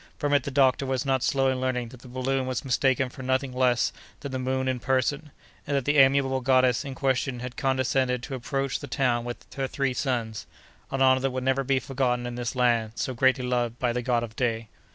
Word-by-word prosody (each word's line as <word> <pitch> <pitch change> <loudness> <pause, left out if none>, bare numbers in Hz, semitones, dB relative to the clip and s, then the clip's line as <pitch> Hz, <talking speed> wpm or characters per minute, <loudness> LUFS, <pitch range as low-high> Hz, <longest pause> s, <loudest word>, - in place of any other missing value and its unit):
From 145 0 -1
it 145 - +4
the - - -2
doctor 135 -1 +3
was 130 0 -1
not 135 -2 +1
slow 135 -1 +2
in 130 -1 -3
learning 125 -2 -1
that 125 - -13
the 130 - -13
balloon 130 +1 -1
was 130 +1 -3
mistaken 130 0 +2
for 135 - -11
nothing 130 0 -1
less 125 -1 +2 0.3
than 140 - -5
the 130 - -3
moon 130 +1 -1
in 130 -1 0
person, 140 +4 0 0.4
and 140 -1 +1
that 135 - -2
the 145 0 +3
amiable 135 -1 +4
goddess 130 -1 +3
in 135 -2 -6
question 130 -1 0
had 125 0 -6
condescended 130 -1 0
to 135 - -6
approach 135 +1 -2
the 145 - -8
town 125 -3 0
with 120 0 -7
her 135 -1 -2
three 135 -1 -1
sons—an 125 +1 -4
honor 130 0 +5
that 135 +1 0
would 130 0 -4
never 135 +1 +1
be 135 0 +1
forgotten 125 -2 -1
in 120 - -4
this 120 +1 -4
land 120 -3 +2
so 130 - -2
greatly 130 +1 +2
loved 120 -2 -1
by 125 -2 0
the 125 - -1
god 120 -1 +1
of 115 -1 -7
day. 115 -3 -1
130 Hz, 225 wpm, -26 LUFS, 125-135 Hz, 0.4 s, honor